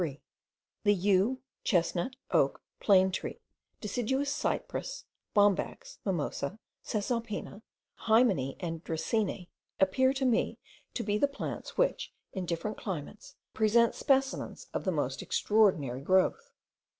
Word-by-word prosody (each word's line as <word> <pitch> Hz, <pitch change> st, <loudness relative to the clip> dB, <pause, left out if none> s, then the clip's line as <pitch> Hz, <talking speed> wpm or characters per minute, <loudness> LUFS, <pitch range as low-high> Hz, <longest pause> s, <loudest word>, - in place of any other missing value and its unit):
The 205 Hz, -1 st, +5 dB
yew, 200 Hz, +7 st, +2 dB, 0.2 s
chestnut, 175 Hz, +5 st, +1 dB, 0.2 s
oak, -, -, +2 dB, 0.2 s
plane 190 Hz, -2 st, +5 dB
tree, 185 Hz, -, -4 dB, 0.4 s
deciduous 260 Hz, +6 st, -1 dB
cypress, 295 Hz, -, -3 dB, 0.3 s
bombax, 205 Hz, -2 st, +2 dB
mimosa, 175 Hz, -1 st, -2 dB, 0.3 s
caesalpina, 215 Hz, -1 st, -3 dB, 0.5 s
hymenaea, 220 Hz, -, +4 dB
and 165 Hz, -2 st, -4 dB
dracaena, 180 Hz, +3 st, -1 dB, 0.3 s
appear 260 Hz, +8 st, +4 dB
to 270 Hz, -1 st, -1 dB
me 245 Hz, -3 st, +1 dB, 0.4 s
to 235 Hz, -, -1 dB
be 205 Hz, 0 st, 0 dB
the 285 Hz, -, +4 dB
plants 280 Hz, -, -6 dB
which, -, -, 0 dB, 0.2 s
in 185 Hz, -2 st, -4 dB
different 175 Hz, +6 st, -2 dB
climates, 190 Hz, +1 st, -6 dB, 0.2 s
present 225 Hz, +2 st, +4 dB
specimens 270 Hz, -1 st, 0 dB
of -, -, -3 dB
the -, -, +2 dB
most -, -, -1 dB
extraordinary 175 Hz, -, +2 dB
growth. 190 Hz, -, +2 dB
205 Hz, 115 wpm, -30 LUFS, 185-240 Hz, 0.5 s, The